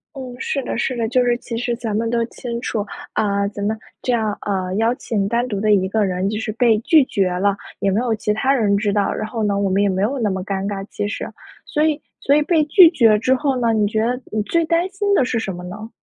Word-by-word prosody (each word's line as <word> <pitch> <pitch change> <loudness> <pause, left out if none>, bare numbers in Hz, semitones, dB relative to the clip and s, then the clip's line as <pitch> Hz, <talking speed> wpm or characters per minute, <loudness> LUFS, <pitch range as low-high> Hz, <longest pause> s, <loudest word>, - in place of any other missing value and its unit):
嗯， 255 -2 -7
是 275 +1 -2
的 - - -3
是 255 +2 -1
的。 230 -1 0
就 250 +2 +2
是 240 -1 +2
其 235 -1 -6
实 240 0 -1
咱 230 -3 -4
们 225 +1 0
都 235 0 +1
清 235 0 -6
楚， 215 -4 -2 0.3
啊， 200 -1 +1
咱 205 0 -6
们 220 +1 -1 0.2
这 250 - -1
样 220 -3 0
啊， 185 -2 -2
邀 225 +3 +2
请 205 -6 -2
单 235 +3 0
独 205 -5 -3
的 215 +1 +2
一 190 -2 +3
个 215 +1 +1
人 185 +1 -1
就 215 0 -3
是 220 0 -3
被 230 -1 +3
拒 300 +6 +5
绝 195 -6 0
了 195 +2 +1 0.2
也 195 - +1
没 200 - +1
有 235 -2 0
其 210 -1 -1
他 265 +6 +1
人 215 -6 +2
知 205 0 0
道， 205 -1 +1
然 215 - -4
后 220 0 -3
呢 200 -1 +1
我 200 -1 +1
们 190 +2 +2
也 200 - +2
没 190 0 -1
有 240 +8 0
那 220 -3 +1
么 190 -1 -2
尴 195 0 -3
尬 195 -1 -4
其 205 - -3
实。 205 - -4 0.4
所 300 - 0
以 310 -1 +1 0.2
所 280 - +3
以 300 - +4
被 320 0 +2
拒 340 +3 +8
绝 225 -10 +4
之 255 +4 +2
后 270 -1 0
呢， 230 -2 +2
你 215 -1 +2
觉 220 +1 0
得 245 +2 -1
你 215 - 0
最 335 +9 +1
担 335 +3 +1
心 400 +1 -1
的 335 - +4
是 240 -2 -1
什 195 -4 -3
么 180 - -8
呢？ 210 +5 -8
220 Hz, 290 characters per minute, -20 LUFS, 205-250 Hz, 0.4 s, 拒